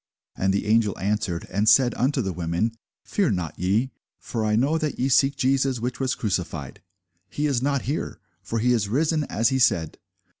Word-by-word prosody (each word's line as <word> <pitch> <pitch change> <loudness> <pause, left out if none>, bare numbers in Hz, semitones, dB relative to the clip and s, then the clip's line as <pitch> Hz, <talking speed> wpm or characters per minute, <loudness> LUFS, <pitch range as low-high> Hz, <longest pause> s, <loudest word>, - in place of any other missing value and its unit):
And 95 0 +1
the 100 +1 -1
angel 110 -2 +2
answered 100 -4 -2
and 105 +3 +2
said 125 -3 +5
unto 130 +1 0
the 95 -2 -3
women, 85 +6 -1 0.3
Fear 195 - 0
not 90 -4 -4
ye: 105 +9 +1 0.3
for 115 -2 -4
I 105 0 +1
know 140 +8 +2
that 155 -3 -2
ye 130 - 0
seek 135 +1 +3
Jesus, 135 -1 +1
which 120 0 -4
was 130 -1 0
crucified. 85 - -3 0.5
He 145 +9 -2
is 135 -5 +1
not 140 0 0
here: 145 +5 -3 0.2
for 110 +4 -4
he 125 +2 +2
is 105 -4 0
risen, 155 +5 +1
as 115 -1 +1
he 130 - 0
said. 80 - +1
115 Hz, 190 wpm, -24 LUFS, 100-135 Hz, 0.5 s, said